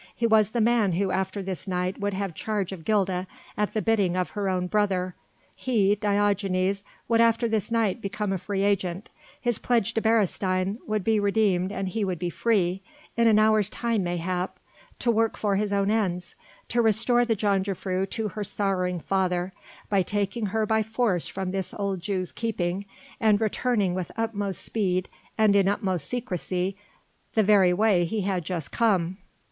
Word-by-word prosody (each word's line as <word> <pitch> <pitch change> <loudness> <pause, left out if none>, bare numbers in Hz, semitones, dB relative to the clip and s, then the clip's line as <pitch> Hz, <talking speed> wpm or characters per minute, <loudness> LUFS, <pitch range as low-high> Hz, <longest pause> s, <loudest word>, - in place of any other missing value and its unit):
He 235 - 0
was 215 -2 +4
the 235 +1 -1
man 220 -4 +3
who 190 +2 0
after 190 +1 -2
this 190 0 -5
night 180 0 -2
would 205 -1 -1
have 195 -2 -3
charge 200 +2 -2
of 170 -5 -8
Gilda, 190 -3 +1 0.3
at 210 +1 -1
the 215 - 0
bidding 205 -6 +2
of 185 -1 -1
her 200 -2 -2
own 180 -1 0
brother; 185 -2 0 0.4
he 210 -6 +2
Diogenes 200 -2 +1 0.2
would 230 0 +3
after 230 +1 +3
this 220 -2 -1
night 230 -2 +1
become 200 0 -2
a 190 - -2
free 195 +1 -2
agent, 195 -1 -1 0.3
his 240 -3 0
pledge 235 -5 +1
to 225 - 0
Beresteyn 195 -2 +1
would 215 -2 -1
be 220 +1 +2
redeemed 200 -3 +2
and 195 -1 -3
he 215 +3 -2
would 185 -3 -1
be 175 +1 -3
free 195 -5 +1 0.3
in 230 0 +3
an 215 -2 +5
hour's 215 -1 +4
time 230 -3 -1
mayhap 180 +1 -2 0.4
to 235 - +1
work 225 0 +1
for 205 -2 0
his 205 +1 0
own 200 0 +1
ends 180 -5 -1 0.4
to 240 - +2
restore 230 +2 +3
the 235 -2 +1
jongejuffrouw 195 -2 -1
to 220 -2 -2
her 210 +2 -4
sorrowing 185 -3 -1
father, 185 0 -1 0.3
by 200 -2 +2
taking 205 +3 -1
her 220 +2 0
by 220 +1 +2
force 220 -5 0
from 190 -1 -4
this 190 -1 -3
old 200 -2 -2
Jew's 185 -1 -2
keeping 195 -4 -2 0.3
and 215 -2 +4
returning 215 -3 +1
with 185 -1 -4
utmost 205 -4 -2
speed 185 -4 -1 0.3
and 215 -2 +4
in 195 -1 +4
utmost 185 -6 -1
secrecy 190 -5 -2 0.6
the 220 - +4
very 195 -3 +5
way 195 -1 +3
he 215 +5 -2
had 185 -2 -1
just 165 -3 -4
come. 190 -6 +1
200 Hz, 175 wpm, -26 LUFS, 185-220 Hz, 0.6 s, an